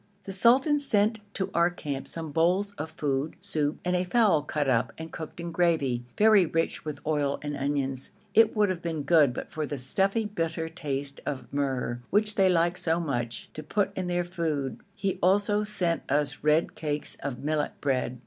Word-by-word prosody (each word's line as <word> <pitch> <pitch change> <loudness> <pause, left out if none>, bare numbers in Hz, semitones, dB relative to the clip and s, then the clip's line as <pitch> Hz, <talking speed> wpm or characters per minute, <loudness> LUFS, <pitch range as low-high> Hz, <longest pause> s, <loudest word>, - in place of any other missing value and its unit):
The 195 - -5
sultan 260 +9 +4
sent 220 -5 +2 0.2
to 190 0 -2
our 170 +1 +4
camp 145 -6 -5
some 160 -2 -4
bowls 180 +6 +2
of 155 - -3
food, 145 -1 -2
soup, 155 -6 -1
and 180 0 +1
a 180 - +1
fowl 195 -4 +3
cut 150 -1 -2
up 115 -3 +2
and 160 0 -7
cooked 160 +1 -8
in 170 0 -4
gravy, 160 -8 +1
very 215 -2 +6
rich 165 +1 -1
with 150 -2 -5
oil 145 -2 0
and 145 0 -3
onions. 135 -2 -2 0.2
It 225 0 +5
would 210 -2 +3
have 180 -2 -2
been 160 -3 -3
good 150 -3 +5
but 120 - -7
for 155 -1 -3
the 145 - -4
stuffy, 195 - 0
bitter 165 -5 -2
taste 140 -4 -3
of 140 -1 -5
myrrh, 130 -4 -1
which 210 0 +2
they 195 -2 +4
like 175 0 +2
so 170 -2 +1
much 120 -8 -3
to 155 - -6
put 200 +6 -1
in 185 -1 -2
their 175 0 0
food. 160 -6 -2 0.2
He 195 -2 -1
also 205 +3 +3
sent 180 -5 0
us 145 -1 +1
red 155 +2 +3
cakes 150 -1 -2
of 135 -3 -3
millet 150 0 -1
bread. 130 -3 -1
160 Hz, 190 wpm, -27 LUFS, 145-190 Hz, 0.2 s, very